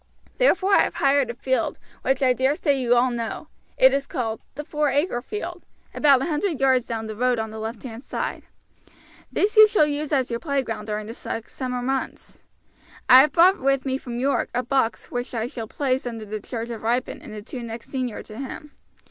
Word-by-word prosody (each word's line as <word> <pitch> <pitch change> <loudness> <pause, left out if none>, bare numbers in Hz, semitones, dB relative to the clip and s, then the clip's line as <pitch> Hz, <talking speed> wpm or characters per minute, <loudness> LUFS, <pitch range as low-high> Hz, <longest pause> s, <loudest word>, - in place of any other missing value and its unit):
Therefore 395 -5 +3
I - - +7
have - - -1
hired 275 -2 +3
a 235 - -4
field, 260 -1 -1 0.2
which 270 +1 +1
I 255 -1 +5
dare 265 +3 +1
say 290 -2 +1
you 245 -2 +2
all 250 +1 +3
know; 230 -2 -4 0.3
it 260 0 +6
is 275 0 -1
called 225 -6 -3
'The 295 - -5
Four 300 -1 0
Acre 280 -2 0
Field,' 350 - -6 0.3
about 275 -3 +4
a - - -1
hundred 325 0 -1
yards 260 -2 +3
down 225 -1 -3
the 215 -1 -6
road 250 +2 +1
on 220 -1 -3
the 220 - -7
left 220 0 -5
hand 230 -2 -7
side. - - -4 0.9
This 420 +3 +1
you 430 0 +10
will 305 - +6
use 295 0 -3
as 260 -4 +1
your 235 - -2
playground 270 -8 -2
during 210 0 -3
the 225 - -7
six 225 -1 -6
summer 250 -2 -3
months. 265 +1 -4 0.7
I 255 0 +10
have 285 +2 +5
brought 360 +6 +5
with 275 0 +1
me 265 0 -1
from 240 -2 -6
York 275 +2 +1
a 250 - +1
box 245 -3 -1
which 245 0 -4
I 225 -1 -1
shall 240 -3 -6
place 260 0 -1
under 225 -2 -6
the 215 +1 -5
charge 230 +2 -5
of 230 - -6
Ripon 240 +3 -1
and - - -11
the 210 -1 -8
two 250 +2 -7
next 230 0 -7
senior 255 -4 -3
to 215 0 -10
him. 275 +2 -7
255 Hz, 215 wpm, -24 LUFS, 230-280 Hz, 0.9 s, you